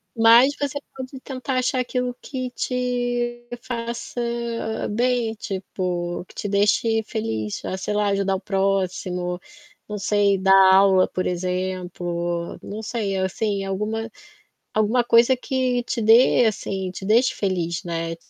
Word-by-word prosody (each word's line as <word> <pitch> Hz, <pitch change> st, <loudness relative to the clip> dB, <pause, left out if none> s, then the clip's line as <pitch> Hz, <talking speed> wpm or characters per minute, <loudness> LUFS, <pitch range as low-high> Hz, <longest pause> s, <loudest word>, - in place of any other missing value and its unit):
Mas, 230 Hz, +4 st, +6 dB
você 285 Hz, 0 st, -1 dB, 0.2 s
pode 260 Hz, 0 st, -7 dB
tentar 260 Hz, -1 st, -4 dB
achar 255 Hz, +1 st, +1 dB
aquilo 250 Hz, 0 st, -2 dB
que 255 Hz, -2 st, -5 dB
te 245 Hz, -1 st, -2 dB, 0.2 s
faça 235 Hz, 0 st, -4 dB, 0.7 s
bem, 240 Hz, 0 st, +1 dB
tipo, 180 Hz, -4 st, -4 dB
que -, -, -18 dB
te 210 Hz, -, -4 dB
deixe 210 Hz, +3 st, +2 dB
feliz, 110 Hz, -, -3 dB
fa -, -, -4 dB
sei 190 Hz, -, -3 dB
lá, 210 Hz, 0 st, +2 dB
ajudar 195 Hz, -1 st, +1 dB
o 190 Hz, -, -5 dB
próximo, 185 Hz, -2 st, -1 dB, 0.5 s
não 210 Hz, -, -3 dB
sei, 205 Hz, 0 st, +2 dB
dar 190 Hz, 0 st, +4 dB, 0.2 s
aula 190 Hz, -1 st, +5 dB
por 185 Hz, -, -3 dB
exemplo, 180 Hz, -1 st, -3 dB
não 210 Hz, +2 st, -6 dB
sei, 210 Hz, -3 st, -2 dB
assim, 195 Hz, +2 st, -1 dB
alguma 215 Hz, +4 st, -3 dB, 0.6 s
alguma 215 Hz, +3 st, +2 dB
coisa 235 Hz, +2 st, +5 dB
que 255 Hz, -1 st, -1 dB
te 235 Hz, 0 st, -3 dB
dê 230 Hz, +3 st, +6 dB
assim, 195 Hz, -3 st, -2 dB
te 190 Hz, -, -8 dB
deixe 235 Hz, +5 st, +3 dB
feliz, 175 Hz, -4 st, -2 dB
né, 165 Hz, -1 st, -3 dB
210 Hz, 135 wpm, -23 LUFS, 185-240 Hz, 0.7 s, Mas